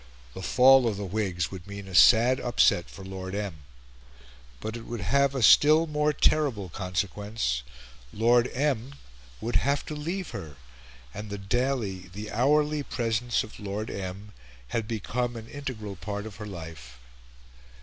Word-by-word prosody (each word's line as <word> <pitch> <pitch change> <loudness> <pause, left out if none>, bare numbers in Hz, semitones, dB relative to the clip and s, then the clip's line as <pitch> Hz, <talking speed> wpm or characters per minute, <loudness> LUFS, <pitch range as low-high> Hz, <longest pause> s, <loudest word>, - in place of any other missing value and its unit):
The - - -7
fall 130 +4 +6
of 105 -3 -1
the 100 - -4
Whigs 95 -3 -2
would 95 -1 -9
mean 100 -1 -8
a 95 - -9
sad 120 +7 +6
upset 120 -7 +2
for 95 - -11
Lord 95 0 -6
M. 100 -5 -3 1.0
But 110 - -5
it 115 - -8
would 120 -2 -5
have 140 +7 +2
a 130 - 0
still 155 +8 +7
more 150 -1 +1
terrible 140 -10 +1
consequence: 90 - -2 0.5
Lord 120 +3 +3
M. 135 -1 -1 0.5
would 115 +2 +1
have 140 +2 0
to 155 - -5
leave 170 +5 -4
her; 75 -3 -7 0.6
and 105 +1 -7
the 100 - -4
daily, 100 -3 -1
the 105 +2 -7
hourly, 150 +5 +2
presence 120 -3 -1
of 110 - -12
Lord 105 +1 -4
M. 100 +2 -6 0.4
had 115 -2 -2
become 120 +2 -2
an 115 -1 -8
integral 120 -9 -6
part 105 +2 -5
of 105 -3 -9
her 105 0 -7
life. 80 -9 -9
110 Hz, 155 wpm, -27 LUFS, 95-130 Hz, 1.0 s, still